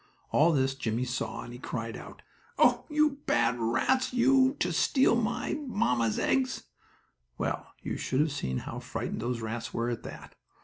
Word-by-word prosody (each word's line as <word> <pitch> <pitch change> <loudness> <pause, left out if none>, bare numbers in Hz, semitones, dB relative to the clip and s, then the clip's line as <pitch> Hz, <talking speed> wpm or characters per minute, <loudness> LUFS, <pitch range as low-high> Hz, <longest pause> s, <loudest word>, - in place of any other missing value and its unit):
All 160 +3 +5
this 135 -3 +2
Jimmie 120 -2 -2
saw, 125 0 -3
and 120 - -9
he 120 - -9
cried 115 -3 -4
out: - - -11 0.3
"Oh, - - +4
you 300 -2 +2
bad 120 +1 +2
rats, 130 - +1
you, 265 +2 +4
to 175 0 0
steal 260 - +3
my 240 +1 -1
mamma's 120 - +1
eggs!" 260 -1 +1 0.7
Well, - - -2 0.2
you - - -3
should 130 +2 0
have 155 0 +1
seen 65 - -2
how - - -5
frightened - - -4
those 120 0 -2
rats 115 +1 -4
were 120 +1 0
at 120 - -4
that! - - -10
135 Hz, 170 wpm, -29 LUFS, -, 0.7 s, All